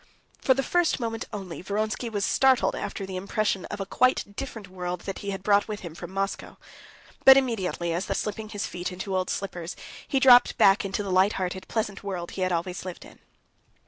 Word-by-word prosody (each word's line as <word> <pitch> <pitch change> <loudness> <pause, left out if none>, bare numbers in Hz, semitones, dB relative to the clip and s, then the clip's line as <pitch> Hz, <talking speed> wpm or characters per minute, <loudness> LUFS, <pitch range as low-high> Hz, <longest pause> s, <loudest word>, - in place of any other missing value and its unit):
For 260 - +4
the 270 - 0
first 350 +2 +1
moment 225 -2 -3
only, 190 -5 -6
Vronsky 215 +5 -2
was 205 -3 -1
startled 265 -2 +3
after 195 - -4
the 190 -1 -7
impression 195 0 -1
of 205 - -6
a 195 - -2
quite 205 -1 +1
different 225 -6 -6
world 180 -1 -5
that 195 - -5
he 200 - -5
had 195 -1 -4
brought 205 0 +3
with 210 -1 -5
him 170 -3 -7
from - - -8
Moscow. 195 +1 -3 0.7
But 265 0 +10
immediately 190 -9 0
as 175 +3 -2
though - - -1
slipping 215 0 -3
his 205 -2 -3
feet 180 +1 -4
into 190 +1 -4
old 185 -1 0
slippers, 175 -3 -4 0.3
he 270 - +1
dropped 250 -2 +7
back 195 0 +5
into 195 +1 -2
the 195 - -4
light 185 +3 +4
hearted, 185 0 -4
pleasant 210 -3 -3
world 180 -4 -4
he 190 - -5
had 185 0 +1
always 175 +1 -2
lived 185 -2 -7
in. - - -16
195 Hz, 210 wpm, -26 LUFS, 185-220 Hz, 0.7 s, But